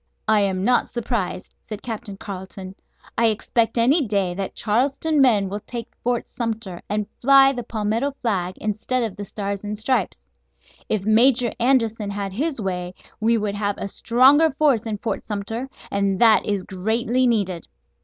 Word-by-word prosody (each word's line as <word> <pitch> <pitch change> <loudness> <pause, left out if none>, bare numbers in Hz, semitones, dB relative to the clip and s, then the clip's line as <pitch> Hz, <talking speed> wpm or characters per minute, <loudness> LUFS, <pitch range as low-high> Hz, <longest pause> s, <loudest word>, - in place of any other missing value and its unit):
"I 220 -1 +4
am 190 -2 0
not 245 +1 +3
surprised," 230 -6 -3
said 215 -1 -8
Captain 220 -4 -6
Carleton. 190 -1 -8 0.5
"I 230 - +5
expect 225 +1 0
any 270 +7 +4
day 200 -4 0
that 195 +1 -5
Charleston 275 +7 +1
men 215 -7 +4
will 200 +2 -4
take 235 +2 -7
Fort 245 0 -1
Sumter, 225 -6 -4
and 210 0 -1 0.2
fly 275 +1 +6
the 245 - -4
palmetto 225 +4 -2
flag, 185 -6 -2
instead 220 +4 -1
of 220 -4 -3
the 205 - -6
Stars 200 0 -5
and 210 0 -4
Stripes. 240 +5 -1 0.6
If 210 -3 -1
Major 235 +2 +4
Anderson 230 -4 +1
had 200 -1 -4
his 280 +5 -1
way 180 -3 -3 0.2
we 230 +1 +2
would 210 -2 -2
have 205 0 -2
a - - -4
stronger 265 +10 +4
force 270 -6 +1
in 215 -2 -2
Fort 225 - -3
Sumter, 225 +5 -4 0.2
and 200 -1 0
that 225 -2 +5
is 200 -3 -1
greatly 230 +7 0
needed." 195 -7 -1
220 Hz, 165 wpm, -22 LUFS, 200-240 Hz, 0.6 s, fly